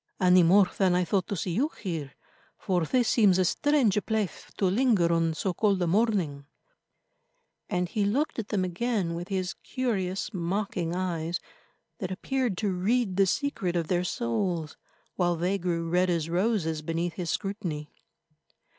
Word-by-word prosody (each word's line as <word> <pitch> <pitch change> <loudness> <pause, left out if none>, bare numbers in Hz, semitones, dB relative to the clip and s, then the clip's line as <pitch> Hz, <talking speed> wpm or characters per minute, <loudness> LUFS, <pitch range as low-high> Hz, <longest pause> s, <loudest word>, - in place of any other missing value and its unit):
"Any 180 -1 +6
more 185 +3 +6
than 185 -2 +4
I 180 0 +2
thought 185 +1 0
to 200 - -2
see 180 0 -3
you 260 - +1
here, 160 - -4 0.4
for 180 -3 0
this 245 +7 +2
seems 205 -6 +4
a 185 - +3
strange 235 - +2
place 220 -4 -2
to 195 - +1
linger 190 -4 +3
on 165 -1 +1
so 185 +3 -1
cold 200 +1 +2
a 175 - +1
morning," 175 -8 0 1.2
and 180 0 0
he 205 +4 -1
looked 250 +8 0
at 215 - -4
them 200 -4 0
again 185 0 -1
with 170 +1 -5
his 190 -2 -2
curious, 195 -8 -2
mocking 175 -1 -2
eyes 175 -2 -2 0.6
that 185 -5 -3
appeared 240 +2 -1
to 205 -2 0
read 200 +2 +1
the 195 0 +4
secret 195 -8 -1
of 165 -2 -1
their 180 -1 +1
souls, 160 - -2 0.4
while 175 -2 +2
they 180 +4 0
grew 170 -2 -1
red 180 +2 +2
as 165 -2 -1
roses 175 -5 0
beneath 165 +2 -2
his 170 0 -4
scrutiny. 175 -8 -3
185 Hz, 165 wpm, -28 LUFS, 170-205 Hz, 1.2 s, Any